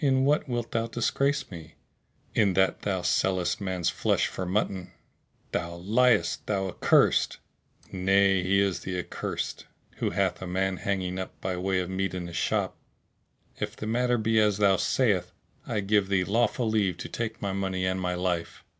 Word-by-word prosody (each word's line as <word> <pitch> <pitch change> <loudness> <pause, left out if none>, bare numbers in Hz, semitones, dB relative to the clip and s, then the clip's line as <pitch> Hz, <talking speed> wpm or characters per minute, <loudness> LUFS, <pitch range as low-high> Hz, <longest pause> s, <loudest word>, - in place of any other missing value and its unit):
"In 130 -1 +3
what 145 -1 +2
wilt 120 -1 -2
thou 115 0 0
disgrace 135 +4 0
me?" 80 -2 -10 0.6
"In 100 -4 +3
that 95 0 +2
thou 95 -3 -1
sellest 90 -1 +1
man's 95 -3 -1
flesh - - +1
for 95 - -4
mutton!" 95 -1 -1 0.6
"Thou 85 0 -2
liest, 110 +6 +2
thou 95 -2 0
accursed!" - - +3 0.5
"Nay, 95 0 +3
he 95 +2 +2
is 100 -2 +1
the 95 -1 -4
accursed 90 - -4 0.3
who - - 0
hath 95 -1 0
a 95 - -5
man 95 +1 0
hanging 95 -2 -2
up 95 - -7
by 95 -1 -2
way 95 +1 0
of 90 +1 -5
meat 95 0 -1
in 90 -1 -4
his 85 -1 -8
shop. - - 0 0.8
If - - -3
the - - -6
matter 120 +2 +1
be 110 0 +2
as 105 -2 +3
thou 100 -2 +4
sayest, 100 -9 +1 0.3
I 105 - -1
give 100 0 +2
thee 95 -2 +2
lawful 115 +4 +1
leave 100 -5 +1
to - - -6
take 115 -1 -4
my 100 -1 -2
money 95 -1 -1
and 95 0 -1
my 90 0 -1
life." 90 -2 -2
95 Hz, 175 wpm, -27 LUFS, 90-110 Hz, 0.8 s, thou